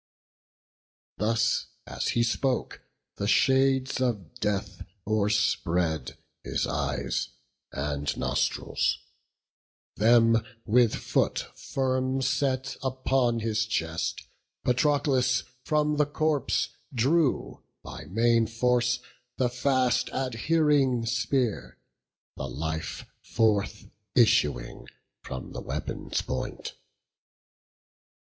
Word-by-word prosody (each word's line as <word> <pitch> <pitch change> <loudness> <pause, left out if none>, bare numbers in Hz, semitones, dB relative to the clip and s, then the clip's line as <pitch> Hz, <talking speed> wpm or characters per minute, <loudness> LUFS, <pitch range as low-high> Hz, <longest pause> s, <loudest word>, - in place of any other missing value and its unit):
Thus 110 +1 +1 0.2
as - - -3
he 120 - +4
spoke, 125 +3 -1 0.4
the 100 - -2
shades 130 +2 +3
of 110 -10 -1
death 100 -2 -2 0.2
o'erspread 95 -8 0 0.3
His - - -1
eyes - - -2 0.4
and 70 +1 -2
nostrils; - - 0 1.0
then 115 +1 +5 0.2
with 115 0 +4
foot - - 0
firm 130 0 -1
set 130 0 0
Upon 130 -2 +1
his 110 0 0
chest, 80 -4 -2 0.4
Patroclus 130 -1 +2 0.2
from 150 -1 +1
the 150 -1 +3
corpse 150 -2 0 0.2
Drew, 135 +5 +1 0.2
by - - -8
main 115 +2 +2
force, 125 +1 +1 0.4
the 125 -2 +2
fast 125 0 +1
adhering 135 0 +1
spear; 115 - -1 0.6
The 65 - -4
life 80 +5 -4 0.2
forth 105 -2 0 0.3
issuing 75 - +2 0.4
with 65 - -6
the - - -5
weapon's - - -3
point. - - -4
120 Hz, 85 wpm, -27 LUFS, 105-130 Hz, 1.0 s, then